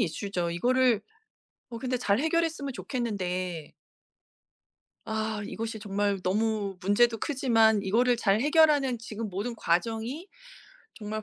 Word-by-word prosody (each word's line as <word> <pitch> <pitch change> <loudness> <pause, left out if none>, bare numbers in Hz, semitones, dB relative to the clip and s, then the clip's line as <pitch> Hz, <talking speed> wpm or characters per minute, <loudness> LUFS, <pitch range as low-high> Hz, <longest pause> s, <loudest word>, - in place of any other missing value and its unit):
이슈죠. 175 0 -2
이거를 245 +5 +2 0.7
어 235 - -6
근데 255 0 -1
잘 205 -3 +1
해결했으면 320 -3 0
좋겠는데 185 - -4 1.3
아 220 -1 -2
이것이 225 0 -5
정말 200 -1 -1
너무 205 0 0
문제도 225 +5 +3
크지만 225 -6 +2
이거를 240 +5 +2
잘 210 -2 +2
해결하는 290 -4 +4
지금 225 -1 -6
모든 205 +6 -4
과정이 225 - -1 0.7
정말 215 0 -5
220 Hz, 265 characters per minute, -28 LUFS, 200-250 Hz, 1.3 s, 해결하는